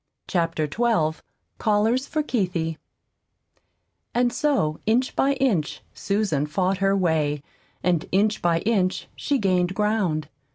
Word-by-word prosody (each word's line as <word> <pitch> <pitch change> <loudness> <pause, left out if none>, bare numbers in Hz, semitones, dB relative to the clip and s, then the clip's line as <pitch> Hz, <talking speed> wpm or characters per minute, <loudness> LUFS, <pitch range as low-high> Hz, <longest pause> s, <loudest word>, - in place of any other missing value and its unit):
CHAPTER 165 -3 0
XII 160 -4 +1 0.4
CALLERS 220 +5 +2
FOR 310 - -1
"KEITHIE" 175 - -1 1.4
And 240 0 +2
so 270 - +1
inch 245 +4 +2
by 275 +1 +3
inch 235 - 0
Susan 195 -8 0
fought 185 +4 0
her 195 0 +2
way, 155 -5 +1 0.4
and 175 -3 +1
inch 210 +3 +2
by 170 -1 +2
inch 195 -4 0
she 285 - 0
gained 185 -4 +1
ground. 200 -8 0
190 Hz, 120 wpm, -24 LUFS, 165-225 Hz, 1.4 s, by